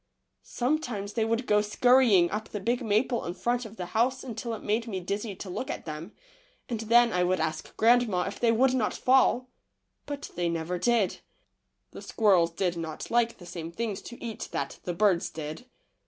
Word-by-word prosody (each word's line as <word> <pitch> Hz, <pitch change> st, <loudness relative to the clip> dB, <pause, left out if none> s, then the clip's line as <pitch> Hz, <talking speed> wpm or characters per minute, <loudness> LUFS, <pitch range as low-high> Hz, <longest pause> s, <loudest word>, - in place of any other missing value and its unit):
Sometimes 240 Hz, -7 st, -2 dB
they 225 Hz, -, +1 dB
would 230 Hz, +2 st, 0 dB
go 210 Hz, -2 st, +3 dB
scurrying 215 Hz, -4 st, +4 dB
up 215 Hz, +2 st, -4 dB
the 210 Hz, -, -4 dB
big 240 Hz, +5 st, -1 dB
maple 225 Hz, +3 st, +1 dB
in 175 Hz, -, -4 dB
front 240 Hz, +4 st, -1 dB
of 220 Hz, 0 st, -10 dB
the 180 Hz, -, -5 dB
house 255 Hz, +4 st, +1 dB
until 235 Hz, -2 st, -4 dB
it -, -, -10 dB
made 225 Hz, +3 st, 0 dB
me 195 Hz, -4 st, -3 dB
dizzy 200 Hz, +3 st, -4 dB
to 190 Hz, -, -8 dB
look 185 Hz, +8 st, -4 dB
at -, -, -5 dB
them, 160 Hz, +4 st, -6 dB, 0.6 s
and 235 Hz, -4 st, -3 dB
then 235 Hz, +1 st, +4 dB
I 180 Hz, 0 st, +2 dB
would 185 Hz, +1 st, +1 dB
ask 160 Hz, 0 st, -3 dB
grandma 225 Hz, -5 st, +4 dB
if 195 Hz, -, -5 dB
they 235 Hz, -1 st, +3 dB
would 255 Hz, +3 st, +3 dB
not 245 Hz, -5 st, 0 dB
fall, 255 Hz, -1 st, +3 dB, 0.6 s
but 285 Hz, -1 st, -6 dB
they 175 Hz, -1 st, -1 dB
never 170 Hz, +2 st, -2 dB
did. 230 Hz, -2 st, +1 dB, 0.7 s
The -, -, -9 dB
squirrels 190 Hz, -7 st, +3 dB
did 175 Hz, +1 st, -1 dB
not 160 Hz, -2 st, -6 dB
like 235 Hz, 0 st, +2 dB
the 175 Hz, -, -13 dB
same 165 Hz, -1 st, -6 dB
things 215 Hz, +1 st, -3 dB
to 240 Hz, -, -11 dB
eat 230 Hz, -2 st, -6 dB
that 140 Hz, -, -4 dB
the 175 Hz, -, -2 dB
birds 195 Hz, -3 st, +2 dB
did. 155 Hz, +9 st, -7 dB
215 Hz, 195 wpm, -28 LUFS, 180-240 Hz, 0.7 s, scurrying